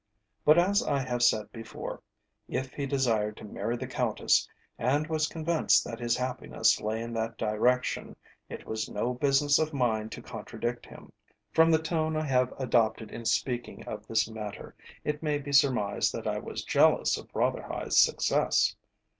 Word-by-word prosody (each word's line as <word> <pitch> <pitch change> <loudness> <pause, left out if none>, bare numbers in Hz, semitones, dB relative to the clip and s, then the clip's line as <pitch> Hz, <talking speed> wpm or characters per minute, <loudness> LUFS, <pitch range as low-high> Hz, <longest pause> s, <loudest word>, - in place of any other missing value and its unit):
But 150 +2 +6
as 195 +4 +4
I 145 - 0
have 125 -2 -2
said 110 -3 +3
before, 115 -1 -7 0.5
if 130 0 -3
he 140 -1 -3
desired 115 -6 0
to - - -11
marry 110 +3 -3
the 130 - -5
Countess, 130 - +1 0.3
and 140 +6 +1
was 155 -1 0
convinced 165 0 +2
that 115 -1 -6
his 120 0 0
happiness 125 0 0
lay 110 +2 -2
in 115 0 -6
that 115 0 -3
direction, 120 +4 0 0.3
it - - -8
was 110 0 -3
no 120 +4 -1
business 140 +2 +3
of 155 -1 -1
mine 110 -4 0
to - - -9
contradict 120 0 -5
him. - - -13 0.4
From 160 0 +5
the 160 - +5
tone 160 -1 -1
I 155 - -1
have 125 -2 +2
adopted 115 -4 +1
in 115 - -8
speaking 120 +1 -1
of - - -7
this 110 -1 +1
matter 110 -2 -7 0.3
it 150 0 -2
may 150 -2 0
be 145 0 -6
surmised 130 -8 +3
that - - -5
I - - -1
was - - -6
jealous - - +4
of - - -9
Rotherhithe's - - -1
success. - - +3
125 Hz, 170 wpm, -29 LUFS, 115-145 Hz, 0.5 s, But